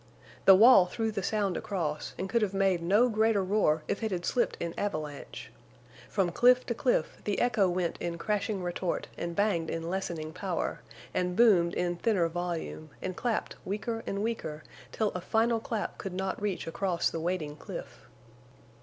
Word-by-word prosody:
The 195 - +10
wall 215 -3 +8
threw 225 +4 -2
the 205 -2 -3
sound 200 -1 0
across, 155 -7 -3
and 190 - -3
could 230 +4 +1
have 200 -2 0
made 195 -3 +2
no 205 +8 +4
greater 220 -3 +2
roar 185 -6 +2
if 200 - -2
it 220 - 0
had 175 -3 -3
slipped 245 - 0
in 170 -1 -3
avalanche. 155 -8 -5 0.6
From 185 -3 +1
cliff 250 +6 +5
to 235 - -1
cliff 235 -8 0
the 205 - -1
echo 220 -6 +3
went 175 -1 -1
in 170 -1 -3
crashing 205 0 -1
retort 175 0 -2
and 170 0 -4
banged 195 -5 +1
in 165 +1 -3
lessening 165 -5 -3
power, 185 -2 -3 0.3
and 180 0 0
boomed 185 -7 +5
in 175 -1 -1
thinner 185 -3 +2
volume, 170 -2 -4
and 185 -1 -4
clapped 235 +1 -2
weaker 225 +3 -3
and 200 +1 -2
weaker 160 -10 -3 0.3
till 215 -2 0
a 180 - -5
final 225 +4 +2
clap 220 -1 -4
could 195 - -5
not 190 +2 -3
reach 205 -3 -2
across 175 +1 0
the 165 - -3
waiting 160 -3 -2
cliff. 150 - -9
190 Hz, 175 wpm, -29 LUFS, 170-215 Hz, 0.6 s, The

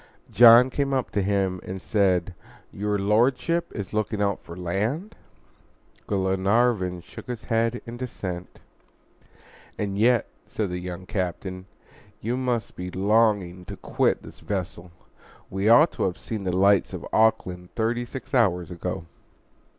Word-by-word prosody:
John 120 +3 +8
came 140 0 0
up 130 - -1
to 100 - 0
him 95 -2 0
and 95 +1 -6
said, 95 -3 +1 0.4
"Your 105 +1 -1
Lordship 125 +11 +1
is 100 -3 -5
looking 110 0 -1
out 100 -1 0
for 85 - -11
land?" 110 - -2 0.9
Glenarvan 95 0 +1
shook - - -12
his 125 -3 -5
head 115 +1 0
in 120 0 -7
dissent. 95 -8 -6 1.2
"And 100 -1 -2
yet," 120 +1 +4 0.2
said 105 -4 -3
the 90 - -3
young 90 0 -7
captain, 95 0 -4 0.5
"you 115 +3 -2
must 125 -3 -2
be 90 0 -5
longing 100 -2 +1
to - - -8
quit - - 0
this - - -12
vessel. 90 -3 -4 0.6
We 95 +3 +1
ought 145 +8 +7
to - - -3
have 90 -2 -2
seen 110 -4 -5
the 90 - 0
lights 100 0 +4
of - - -6
Auckland 90 -5 +2
thirty 120 +2 0
six 130 +2 -9
hours 90 -9 +2
ago." 90 0 -4
100 Hz, 145 wpm, -25 LUFS, 90-115 Hz, 1.2 s, John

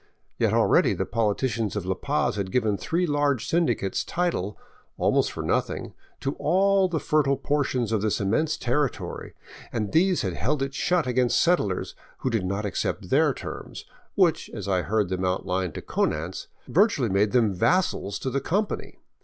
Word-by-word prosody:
Yet - - +2
already - - +3
the - - -1
politicians 115 0 -1
of 100 -4 -3
La 95 - 0
Paz 95 - -1
had 100 -2 -3
given 110 -3 +1
three 170 - -1
large 145 -5 0
syndicates 120 - 0
title, 170 - -2 0.4
almost - - +2
for - - -5
nothing, - - -1 0.3
to 135 - -1
all 190 +5 +3
the 170 -3 -1
fertile 145 -4 +2
portions 130 -6 0
of 110 -3 +1
this 110 -1 0
immense 145 +11 +1
territory, 130 +2 -2 0.4
and 105 -3 -2
these 180 0 +3
held 125 - -1
it 135 0 -4
shut 175 +3 +1
against 125 -1 +2
settlers 135 - +1 0.2
who 130 - -2
did 105 -5 0
not 100 +2 -2
accept 100 - -3
their - - +4
terms, - - -7 0.3
which, 180 -5 +2
as 100 -3 -5
I 95 -2 +2
heard 105 -1 0
them 95 0 -2
outlined 90 -1 -1
to - - -6
Konanz, 80 +4 -2 0.2
vir 200 +7 +5
tually 130 - -2
made 100 +2 +2
them 115 -4 +3
vassals 100 - +1
to 130 - -2
the 140 - -1
companies. 200 +9 -2
120 Hz, 170 wpm, -25 LUFS, 100-155 Hz, 0.4 s, vir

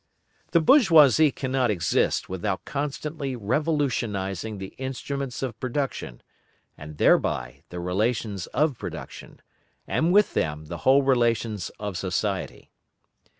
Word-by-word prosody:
The 170 - +4
bourgeoisie 160 - +6
cannot 130 -2 -1
exist 85 -6 +1
without 95 +1 -3
constantly 145 0 -4
revolutionising 110 - -1
the 95 0 -8
instruments 135 0 -4
of 120 -4 -4
production, 130 - -4 0.5
and 75 0 -10
thereby 60 0 +2
the 90 - -6
relations 100 +1 -1
of 150 -2 0
production, - - -9 0.4
and 165 +2 +1
with 205 +2 +4
them 75 0 -2
the 85 +3 -6
whole 140 +1 +6
relations 115 -6 +1
of 100 -5 -4
society. 95 +1 -3
120 Hz, 110 wpm, -25 LUFS, 95-140 Hz, 0.5 s, bourgeoisie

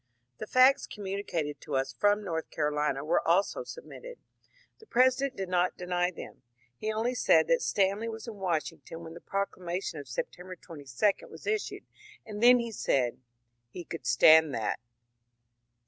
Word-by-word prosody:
The 215 - -5
facts 260 +4 +5
conmiunicated 190 -7 -4
to 145 - -5
us 135 0 -1
from 205 - +2
North 165 -4 -3
Carolina 150 -2 -1
were 165 +3 +2
also 195 - +1
sub 485 0 -9
mitted. - - -10 0.6
The 440 - -18
President 260 +1 +2
did 190 -1 -4
not 180 0 +1
deny 180 0 0
them. 175 - -10 0.3
He 215 - -3
only 225 +3 -1
said 250 - +4
that - - +3
Stanley 200 - +1
was 225 +1 -8
in 220 -3 -7
Washington 165 -3 -3
when 160 0 -9
the 170 - -11
proclamation 185 -4 -3
of 140 - -9
Sep 120 - -3
tember 180 +1 -11
22 150 - -2
was - - -13
issued, 425 0 -2 0.4
and 210 -1 -7
then 245 +1 +7
said 130 - 0 0.5
he 175 +8 -8
*^ - - -44
could 165 - -6
stand 160 -3 +6
that." 110 -2 -2
185 Hz, 165 wpm, -29 LUFS, 160-220 Hz, 0.6 s, then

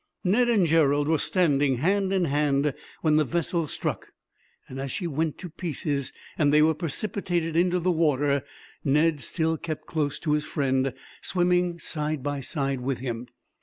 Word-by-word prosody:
Ned 240 +7 +3
and 210 -6 +4
Gerald 145 -3 +3
were 160 -1 +2
standing, 145 -7 +2
hand 190 +8 +1
in 190 -2 +2
hand, 145 -1 +1 0.3
when 155 -2 +4
the 155 - +4
vessel 170 +2 -1
struck; - - -3 0.6
and 130 - -7
as 135 -1 -3
she 185 - -3
went 160 -1 -1
to 185 - -7
pieces, 155 -4 -3 0.3
and 145 -2 +4
they 150 +1 +6
were 160 +1 +4
precipitated 170 0 -2
into 180 +1 +3
the 180 +1 +1
water, 145 -4 +2 0.4
Ned 150 +2 +3
still 160 +5 -1
kept 155 -1 -5
close 150 -4 -1
to 155 - -1
his 150 0 +1
friend, 135 -3 0 0.3
swimming 180 -1 +1
side 150 -4 -2
by 145 0 -2
side 135 -1 -2
with 130 0 -1
him. 120 -1 -4
155 Hz, 165 wpm, -26 LUFS, 140-170 Hz, 0.6 s, they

